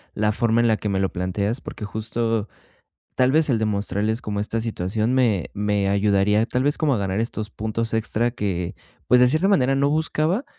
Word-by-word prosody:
la 105 0 +1
forma 115 +1 +1
en 120 - +3
la 110 -1 +2
que 105 - -3
me 95 -1 0
lo 95 -1 +1
planteas 100 +6 -2
porque 105 - -7
justo, 110 0 -2 0.7
tal 130 0 +3
vez 155 +1 +3
el 120 -5 +2
demostrarles 105 +1 -1
como 105 -3 -4
esta 110 +2 -2
situación 110 +1 -1
me 115 -9 +2
me 105 -1 0
ayudaría, 100 +1 +2
tal 125 +1 -1
vez 145 +2 +1
como 150 -4 +1
a - - -1
ganar 100 +1 -1
estos 110 -2 -3
puntos 110 +2 -3
extra 115 +1 0
que, 95 -7 -3 0.3
pues 125 - +5
de 125 - +6
cierta 155 +8 +2
manera 135 -10 +3
no 140 +1 +2
buscaba, 160 - 0
110 Hz, 200 wpm, -23 LUFS, 105-125 Hz, 0.7 s, de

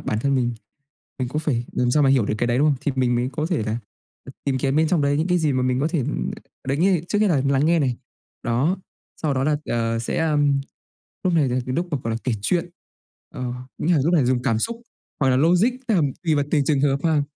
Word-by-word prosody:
bản 105 - -2
thân 140 +2 +1
mình, 120 -2 +1 0.7
mình 130 -2 -2
cũng 150 - -2
phải 130 -7 -1
làm 125 -1 +1
sao 150 +4 +3
mà 135 - +4
hiểu 130 -5 +4
được - - 0
cái 120 - +1
đấy, 120 +1 +1
đúng 145 - +4
không? 145 - +2
Thì 145 - -1
mình 125 -2 +2
mới 120 +1 0
có 150 +3 -2
thể 170 - 0
là, 110 +1 -2 0.5
ừ, - - -9
tìm 135 -2 0
kiếm 135 +2 0
bên 160 0 +3
trong 165 -3 +2
đấy 140 0 +2
những 160 - +1
cái 180 -1 +2
gì 155 -4 +1
mà 130 -1 0
mình 125 0 +1
có 150 - +1
thể, 170 - -1
ừ 125 - -2 0.6
đấy 135 - +1
nghĩa 180 +2 +3
trước 205 - +1
nhất 210 0 +3
là 150 -7 +2
lắng 140 +2 +2
nghe 170 +1 +4
này, 130 -5 0 0.5
đó, 130 +10 +1 0.5
sau 150 -3 +1
đó 130 0 0
là, 150 0 +2
ờ, 115 -1 -1
sẽ, 115 - -2
ừm, 145 -2 +2 0.6
lúc 180 -2 +2
này 150 -5 +3
là 125 +1 0
cái 130 - -2
lúc 170 +5 0
mà 145 - -1
gọi 115 - -1
là 115 - -1
kể 125 - 0
chuyện, 175 - 0 0.6
ờ, 125 -1 -3 0.3
nghĩa 175 - +1
là 165 - +4
lúc 170 +3 +2
này 150 -6 +4
dùng 125 0 +1
cảm 115 -4 +1
xúc 230 - -1 0.4
hoặc 135 - +3
là 125 - +3
logic, 175 - +4 0.2
tức 225 - +2
là 180 - +4 0.2
tùy 160 -2 +2
vào 145 -1 +1
từng 145 -3 +2
trường 140 -1 +2
hợp 140 -1 +2
ha. 155 -3 +3
140 Hz, 275 wpm, -23 LUFS, 125-160 Hz, 0.7 s, mà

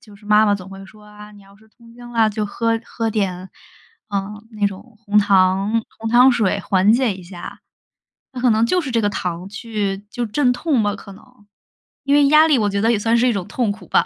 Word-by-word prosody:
就 210 -2 -17
是 210 - -19
妈 210 +1 +5
妈 205 - +3
总 190 -2 -8
会 195 0 -11
说： 210 +2 -18
“啊， 210 0 -13
你 205 - -16
要 195 +1 -20
是 220 +1 -23
痛 230 +1 -20
经 240 0 -12
了 225 -2 +3
就 210 0 -3
喝 230 +2 -1
喝 225 -1 -3
点， 190 -4 -3 0.6
嗯， 200 +1 -3 0.2
那 210 -1 0
种 215 +3 -9
红 205 +1 0
糖 195 +2 +2 0.2
红 225 0 -4
糖 250 +2 +6
水 205 -4 0
缓 195 +3 +2
解 240 -4 +1
一 185 - -11
下”。 175 0 -10 0.7
那 250 - -5
可 250 - +3
能 220 +1 +2
就 360 +9 +1
是 270 - -5
这 230 - +1
个 205 - +1
糖 180 -1 -4
去 210 -3 -4
就 245 0 -3
是 - - -14
镇 265 -4 +2
痛 280 +1 -1
吗， 205 -1 0
可 200 - -12
能？ - - -16 0.8
因 280 - +2
为 290 -1 +5
压 305 +2 +6
力 285 - +3
我 210 -2 +1
觉 200 - -1
得 225 - +3
也 215 - +1
算 225 +2 +1
是 240 +2 +2
一 240 - +2
种 195 -3 -4
痛 235 -5 -1
苦 210 - -13
吧。 - - +3
210 Hz, 260 characters per minute, -19 LUFS, 200-235 Hz, 0.8 s, 糖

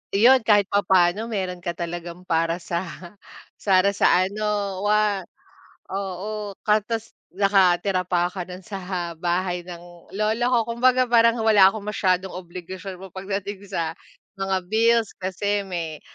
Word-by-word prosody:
'yon 245 +6 +7
kahit 210 -2 +4
papaano 190 +1 +3
meron 185 -4 -3
ka 175 0 -4
talagang 175 +1 -6
para 165 0 +1
sa 170 -1 -3 0.8
para 195 0 +4
sa 185 -2 +4
ano 205 -1 -2
wa 210 -2 +2 0.7
oo 200 +1 -4
ka 210 0 +4
'tas 225 +1 -5 0.2
nakatira 190 -1 +2
pa 175 -1 +2
ka 185 - -4
no'n 180 +1 -10
sa 185 -4 -4
bahay 175 +2 -1
ng 175 -1 -12
lola 220 +3 +1
ko. 235 -3 +2
Kumbaga 255 +1 +3
parang 230 0 +4
wala 200 -3 +7
akong 210 0 -7
masyadong 190 -3 0
obligasyon 185 +1 -8
mo 190 -1 -12
pagdating 195 +1 -4
sa 165 -4 -2 0.4
mga 195 -1 -1
bills 225 +2 +2
kasi 200 +2 -1
may, 170 -5 -5
195 Hz, 135 wpm, -23 LUFS, 180-210 Hz, 0.8 s, yon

